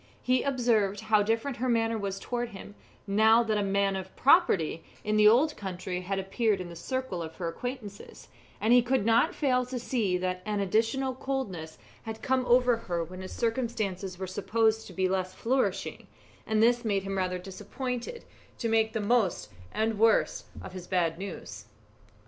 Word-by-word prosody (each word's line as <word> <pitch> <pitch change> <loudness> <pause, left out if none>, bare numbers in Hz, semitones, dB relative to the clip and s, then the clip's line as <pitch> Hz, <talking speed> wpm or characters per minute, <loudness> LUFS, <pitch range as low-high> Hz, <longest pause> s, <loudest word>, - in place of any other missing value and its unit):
He 255 0 +2
observed 230 -7 +1
how 220 -1 +3
different 225 +5 -1
her 255 +2 -1
manner 230 -1 +2
was 200 -3 -3
towards 240 +1 -4
him, 200 +1 -10 0.3
now 220 +3 +5
that 215 -2 0
a - - +1
man 200 0 +1
of 190 0 -6
property 250 - +3 0.2
in 215 0 0
the 210 0 +6
old 275 +8 +4
country 185 -2 -4
had 195 +2 -3
appeared 195 +2 0
in 180 -1 -6
the 170 - -9
circle 260 0 -3
of 160 -1 -7
her 175 - -4
acquaintances, 220 0 -7 0.3
and 220 +3 +3
he 245 - +7
could 245 -3 0
not 230 +10 +3
fail 255 -4 +2
to 255 0 -4
see 230 -6 0
that 185 0 -2
an 210 0 -2
additional 225 +7 +1
coldness 230 -12 -4 0.2
had 220 0 -7
come 260 -1 +1
over 245 -1 +4
her 175 -6 -3
when 185 +3 -9
his 185 - -7
circumstances 215 -6 -2
were 190 - -4
supposed 220 +4 0
to 185 - -11
be 185 +1 +1
less 185 0 -2
flourishing, 225 -6 -1 0.4
and 220 0 +2
this 240 +1 +3
made 200 -4 0
him 195 0 -3
rather 185 -1 -1
disposed 230 +7 -5 0.5
to 235 - -2
make 220 -1 +2
the 220 - -1
most 205 - +1 0.2
and 220 +1 0
the - - -5
worst 225 +1 +2 0.2
of 185 - -9
his 180 -1 -8
bad 170 -3 0
news. 195 0 -7
215 Hz, 185 wpm, -29 LUFS, 190-240 Hz, 0.5 s, he